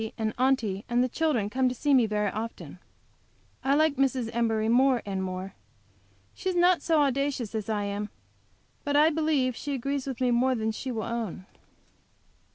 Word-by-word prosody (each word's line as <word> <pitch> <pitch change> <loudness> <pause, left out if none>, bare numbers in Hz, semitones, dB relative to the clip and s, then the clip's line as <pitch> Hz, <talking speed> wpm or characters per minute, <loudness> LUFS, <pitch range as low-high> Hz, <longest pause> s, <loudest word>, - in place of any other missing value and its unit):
and 220 -1 -1
Aunty 235 -7 +1
and 240 +1 +3
the - - +1
children 255 -6 0
come 255 +4 +1
to 250 - -5
see 290 +4 +1
me 250 -4 +5
very 210 -1 0
often. 225 +1 -6 0.8
I 270 +1 +3
like 310 -2 +2
Mrs. 260 -4 0
Embury 225 -2 +1
more 250 +2 +3
and 195 -2 -3
more. 185 +1 -5 0.8
She 375 - -3
is 370 - -2
not 350 -2 +4
so 315 -2 +3
audacious 275 -4 -1
as 220 0 -3
I 210 -2 0
am, 205 +1 -3 0.7
but 285 -1 -1
I 305 +2 +5
believe 295 -5 +1
she 285 +3 -4
agrees 275 +1 -3
with 265 -3 -4
me 250 -1 +2
more 255 +2 +2
than 220 -1 -1
she 255 +4 -5
will 220 -2 -3
own. 230 -6 -4
250 Hz, 180 wpm, -27 LUFS, 220-275 Hz, 0.8 s, me